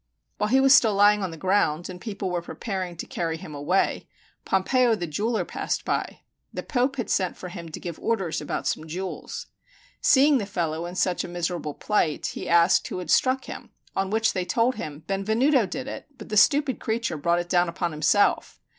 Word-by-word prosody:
While 210 - +1
he 260 +3 +4
was 270 0 +6
still 225 -6 +5
lying 205 +1 +5
on 190 - -2
the 165 - -9
ground, 175 -3 +1
and 180 -1 -9
people 200 -4 -4
were 175 -1 -1
preparing 185 -1 -5
to - - -5
carry 165 -1 -3
him 155 - -10
away, 150 +7 0 0.4
Pompeo 235 +5 +2
the 175 - -4
jeweler 205 +5 -1
passed - - -3
by. - - -2 0.3
The - - -5
Pope 260 +1 0
had 240 -4 -3
sent 185 -2 0
for 180 - -7
him 170 -2 -8
to 155 - -7
give 170 -3 -7
orders 195 -10 -1
about 150 - -4
some 155 - -2
jewels. 185 +4 -5 0.6
Seeing 280 0 +5
the 205 - -4
fellow 165 -3 -2
in 175 - -8
such 180 -1 0
a - - -5
miserable 175 -3 -3
plight, 185 -8 0
he - - -6
asked 170 0 +4
who - - -5
had 180 -3 -4
struck 260 0 +3
him; - - -8 0.3
on 195 0 0
which 220 +2 +1
they 185 - -1
told 230 +7 +1
him, 150 - -7
"Benvenuto 220 +5 +2
did 260 +6 -5
it, - - -7
but 215 - -11
the 215 - -2
stupid 275 +6 +4
creature 225 -5 -2
brought 170 +3 +1
it 175 0 -2
down 175 -1 +2
upon 170 0 -2
himself." 155 +7 +2
190 Hz, 205 wpm, -25 LUFS, 170-225 Hz, 0.6 s, was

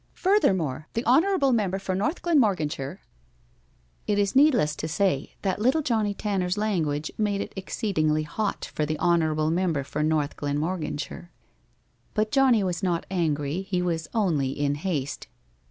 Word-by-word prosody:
Furthermore, 180 - +1
the 230 - -1
honorable 295 +2 +3
member 200 -5 +1
for 195 -1 -3
North 210 - -1
Glenmorganshire 190 - +1 1.1
It 205 - +1
is 200 +1 +1
needless 250 - +4
to 155 - -3
say 160 -4 0
that 190 -1 0
little 265 +7 +2
Johnnie 220 -5 0
Tanner's 190 -2 -1
language 160 -8 -1
made 205 -2 +1
it - - -5
exceedingly 155 -6 0
hot 200 +7 -3
for 155 - -1
the 155 +1 -1
honorable 155 -2 +2
member 170 -5 0
for 150 +3 -4
North 150 -1 0
Glenmorganshire. 150 +2 -3 0.9
But 215 0 +1
Johnnie 260 -6 +4
was 180 -3 -2
not 175 -3 0
angry. 155 -2 0
He 185 -2 -2
was 165 -2 -2
only 170 - +1
in 145 +1 -1
haste. 145 - -3
180 Hz, 145 wpm, -26 LUFS, 155-210 Hz, 1.1 s, needless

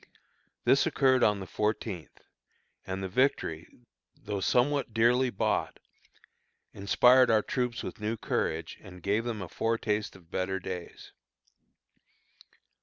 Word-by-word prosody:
This - - +4
occurred 130 -1 +3
on 105 -1 +3
the 95 - -6
fourteenth; 105 -3 -3 0.6
and 95 0 -4
the - - -2
victory, 90 - 0 0.5
though 100 -1 -5
somewhat 125 +3 +1
dearly 125 +3 +3
bought, 100 - -1 1.0
inspired 125 +6 +5
our 110 -2 +4
troops 125 -2 -2
with - - -7
new 110 +2 -2
courage, 80 -5 -2
and 90 -4 -13
gave 105 +4 0
them 110 -5 -3
a - - -7
foretaste 110 0 -1
of 90 -3 -18
better 95 +1 -2
days. 90 -2 -8
105 Hz, 120 wpm, -29 LUFS, 95-120 Hz, 1.0 s, inspired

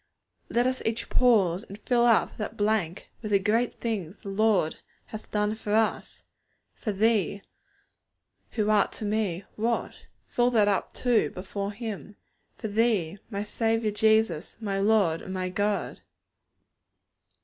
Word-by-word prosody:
_ - - -8
Let 240 +1 +4
us 255 0 0
each 225 +1 -2
pause, 200 -8 +4
and 200 -3 -10
fill 240 +1 +2
up 230 - +3
that 215 +1 -5
blank 205 -4 -1
with 215 - -5
the 200 - +5
great 225 +5 +1
things 205 -6 -3
the 200 - -7
Lord 200 -5 +2 0.3
hath 215 0 -9
done 210 0 0
for 215 -1 -2
us. 220 -1 0 0.5
For 215 - -3
Thee, 205 -1 +1 1.1
who 215 -2 +1
art 210 -2 +3
to 215 - -5
me 205 -4 -1
what? 230 +2 -2 0.2
Fill 240 0 +2
that 215 -3 +4
up 200 -2 0
too, 245 -3 +2
before 200 +2 -5
Him! 210 -2 -6 0.4
For - - -5
Thee, 205 -5 +1
my 200 -2 -3
Saviour 225 0 0
Jesus, 215 -5 +2
my 200 -3 -2
Lord 195 -6 +3
and 190 - -6
my 185 0 -2
God! 205 +2 -1
210 Hz, 150 wpm, -27 LUFS, 195-225 Hz, 1.1 s, the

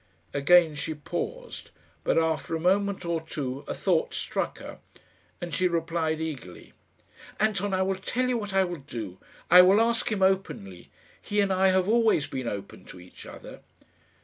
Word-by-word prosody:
Again 160 +3 +5
she 150 +2 -4
paused, 480 - -6 0.3
but - - +1
after 160 -1 0
a - - -2
moment 195 +2 +1
or 170 -1 -1
two 140 -4 -5
a - - -3
thought - - 0
struck - - -3
her, - - -10 0.6
and 175 -1 -6
she 185 - +2
replied 165 -2 -1
eagerly, 140 - -7 0.7
"Anton, 205 -2 +1
I 190 0 +1
will 195 +1 0
tell 235 +7 -2
you 250 -2 0
what 205 -2 -5
I 195 0 +3
will 175 -2 -4
do. 110 -9 -7 0.3
I 180 +1 +11
will 190 +3 +5
ask 235 +1 +1
him 200 -3 0
openly. 185 - -1 0.3
He 205 - -2
and 200 -1 +2
I 190 +1 +3
have 185 0 +2
always 225 -9 +3
been 130 -2 -5
open 100 -3 -6
to 90 - -12
each 90 +1 -14
other." - - -11
175 Hz, 175 wpm, -27 LUFS, 150-195 Hz, 0.7 s, I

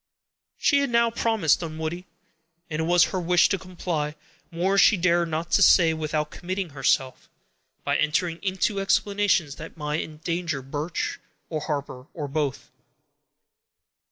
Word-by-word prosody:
She 280 - +3
had 280 - 0
now 235 -1 +3
promised 225 -9 +2
Dunwoodie; 165 +2 -5 0.6
and 155 - -2
it 160 - 0
was 175 +1 +5
her 185 - 0
wish 175 +1 +4
to 195 - 0
comply; 170 -5 -3 0.3
more 180 +3 0
she 200 +1 +6
dare 170 -1 +2
not 165 +1 -3
say 170 -4 +6
without 155 -1 -2
committing 185 0 -4
herself, 135 -1 0 0.5
by - - +1
entering 165 +2 0
into 195 +1 0
explanations 195 -5 +1
that 165 +1 -10
might 150 0 -2
endanger 160 -2 -4
Birch, 145 +5 -3 0.3
or 155 - -1
Harper, 140 -4 -4
or 150 -4 -4
both. 140 -2 -3
170 Hz, 135 wpm, -25 LUFS, 155-185 Hz, 0.6 s, she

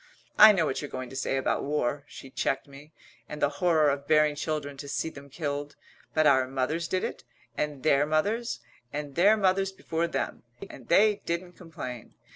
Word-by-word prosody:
I 215 +1 +11
know 180 -6 +2
what 135 - -2
you're 145 - -6
going 130 -1 -6
to - - -9
say 135 0 -1
about 135 - 0
war," 140 -1 -1
she 135 - -11
checked 135 - -1
me, 140 +2 -14 0.4
"and 150 - -6
the 145 - +3
horror 160 -5 +4
of 140 0 -4
bearing 150 -1 +4
children 145 -1 -3
to 140 - -8
see 155 +3 -2
them 140 -2 -12
killed, 145 -1 -4 0.4
but 155 - +4
our 130 -3 +5
mothers 135 +6 -1
did 185 +1 -1
it, - - -4 0.3
and 150 -3 -3
their 145 -1 +3
mothers, 200 - 0 0.3
and 145 -1 -5
their 200 +7 +5
mothers 195 -1 +2
before 170 -3 -2
them. - - -3 0.3
And 125 - -13
they 210 +3 +4
didn't 175 +1 -3
complain. 145 - -8
150 Hz, 190 wpm, -28 LUFS, 140-170 Hz, 0.4 s, I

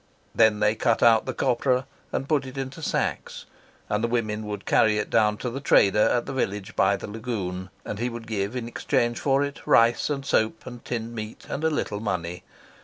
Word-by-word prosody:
Then 110 -2 +4
they 105 0 +4
cut 115 0 +1
out 115 -1 +5
the - - -2
copra 125 +1 +1 0.3
and 135 - -2
put 145 -4 +1
it 130 +1 -9
into 135 +4 -5
sacks, 150 - -2 0.4
and 105 +1 -1
the - - +2
women 110 -3 -2
would 105 -1 -5
carry 110 -1 +3
it 105 - -3
down 105 -2 +3
to 125 - -3
the 135 - -4
trader 105 -6 +4
at 120 - +1
the - - -5
village 100 -6 -3
by 100 +1 +3
the - - -7
lagoon, 100 -5 -4 0.2
and 105 - -5
he 120 +1 0
would 115 -1 -7
give 105 0 -2
in 120 -2 -3
exchange 120 0 0
for 135 0 +2
it 140 0 -4
rice 115 +5 +4
and 140 -2 -2
soap 110 -4 0
and 120 -2 -9
tinned 115 -1 -4
meat 110 -1 -7
and 150 - -3
a 160 - +3
little 105 -9 -2
money. 90 -5 -3
115 Hz, 210 wpm, -25 LUFS, 105-125 Hz, 0.4 s, out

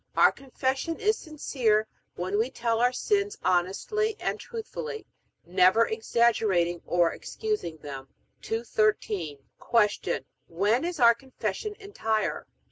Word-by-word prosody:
Our - - +7
Confession 270 +4 -2
is 430 +1 +3
sincere, 250 -9 0 0.3
when 185 +4 -1
we 230 +3 +1
tell 230 -3 -1
our 245 +1 +4
sins 405 - 0
honestly 195 - +1
and - - -2
truthfully, 450 0 -6 0.4
neither 185 +5 +5
exaggerating 220 - +1
nor 175 -1 +3
excusing 425 - -3
them. 135 -3 -8 0.3
213. 215 -8 0 0.2
Q. 210 -3 +1 0.2
When 205 - +1
is 350 -3 -3
our 235 -1 +8
Confession 255 - -4
entire? 225 - -2
230 Hz, 115 wpm, -27 LUFS, -, 0.4 s, our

